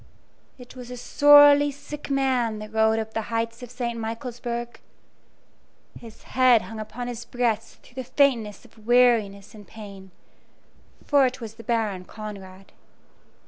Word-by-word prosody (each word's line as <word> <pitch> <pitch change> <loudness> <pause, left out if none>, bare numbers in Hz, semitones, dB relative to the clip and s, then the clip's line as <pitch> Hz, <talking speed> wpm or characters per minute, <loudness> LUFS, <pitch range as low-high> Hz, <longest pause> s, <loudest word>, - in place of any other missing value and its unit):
It 250 0 -14
was 250 -1 -10
a 250 - -7
sorely 290 +2 +6
sick 290 +1 -9
man 260 -5 0
that 215 0 -9
rode 220 0 +3
up 220 0 -4
the 225 - -1
heights 230 0 -3
of 245 - -9
St. 240 -1 -4
Michaelsburg. 235 +1 -5 1.2
His 230 -2 -14
head 255 -3 +3
hung 225 -1 -9
upon 225 +3 -6
his 240 -1 -6
breast 230 -2 -3
through 260 +2 -8
the 255 - -13
faintness 240 -8 +1
of 220 -1 -20
weariness 230 -5 +2
and 210 -2 -14
pain; 200 -3 -11 1.0
for 280 -3 +4
it 255 +1 -6
was 225 -3 -8
the 230 +1 -13
Baron 215 -6 -2
Conrad. 195 -3 -10
235 Hz, 145 wpm, -24 LUFS, 215-250 Hz, 1.2 s, sorely